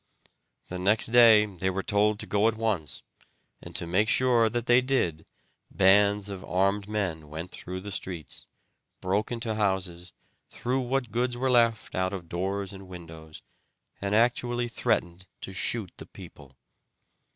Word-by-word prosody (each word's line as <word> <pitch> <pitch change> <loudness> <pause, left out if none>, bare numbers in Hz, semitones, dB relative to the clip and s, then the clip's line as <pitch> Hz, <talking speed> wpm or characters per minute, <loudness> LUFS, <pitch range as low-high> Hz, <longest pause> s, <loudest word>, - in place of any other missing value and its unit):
The 90 - -6
next 105 +5 +3
day 115 -3 +7
they 95 -2 -3
were 95 +1 -3
told 105 +1 +2
to - - -6
go 105 +1 +2
at 115 - +1
once, 105 -10 -2 0.6
and - - -11
to - - -2
make 95 +6 +1
sure 120 -3 +3
that 120 +1 -3
they 120 +1 +5
did 90 - -1 0.4
bands 100 +1 +4
of 100 -2 -7
armed 100 +2 0
men 85 -8 -3
went 80 +4 -7
through 90 +1 -7
the 100 +1 -7
streets, 90 -5 -6 0.5
broke 100 +5 -1
into 115 -2 -2
houses, 95 -4 -2 0.4
threw 125 +2 -2
what 125 -2 -2
goods 120 +2 -1
were 130 +1 0
left 115 -3 +2
out 95 +1 -1
of 90 -4 -6
doors 95 +3 -3
and 95 -1 -11
windows, 80 -3 -11 0.6
and 100 +1 0
actually 120 +1 +1
threatened 90 -5 -1
to 95 - -7
shoot 100 0 -1
the - - -9
people. 65 -2 -14
100 Hz, 155 wpm, -27 LUFS, 90-115 Hz, 0.6 s, day